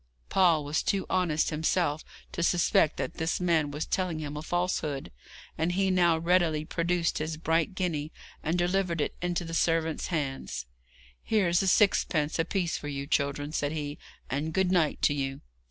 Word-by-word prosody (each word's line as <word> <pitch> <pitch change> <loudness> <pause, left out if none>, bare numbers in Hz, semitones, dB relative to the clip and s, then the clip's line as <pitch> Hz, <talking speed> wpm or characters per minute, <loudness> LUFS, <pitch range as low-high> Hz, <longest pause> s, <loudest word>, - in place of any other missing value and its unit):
Paul 170 -5 +4
was 145 +2 0
too 195 -1 0
honest 175 -4 +1
himself 155 0 0 0.3
to - - -4
suspect 170 -2 +3
that - - -4
this 160 0 -1
man 165 -4 +2
was 150 +2 -3
telling 185 -4 -1
him 150 -1 -5
a 150 - -4
falsehood, 160 -5 -2 0.5
and 165 +2 +1
he 190 +1 +2
now 175 -3 +4
readily 165 -2 +2
produced 170 0 0
his 155 +1 -3
bright 165 +3 0
guinea, 160 -5 -2 0.3
and 160 +3 0
delivered 175 -1 0
it 145 - -1
into 175 0 -1
the 165 - -6
servant's 165 -1 +1
hands. 135 - -3 0.6
'Here's 185 -5 +2
a 195 - 0
sixpence 170 -6 +2
apiece 170 +1 0
for 145 - -7
you, 140 -1 -4
children,' 145 0 -1
said 145 -1 -1
he, 145 -1 -4 0.3
'and 150 +4 -2
good 190 0 +2
night 170 -5 +1
to - - +4
you.' 135 -1 -3
165 Hz, 170 wpm, -28 LUFS, 150-175 Hz, 0.6 s, Paul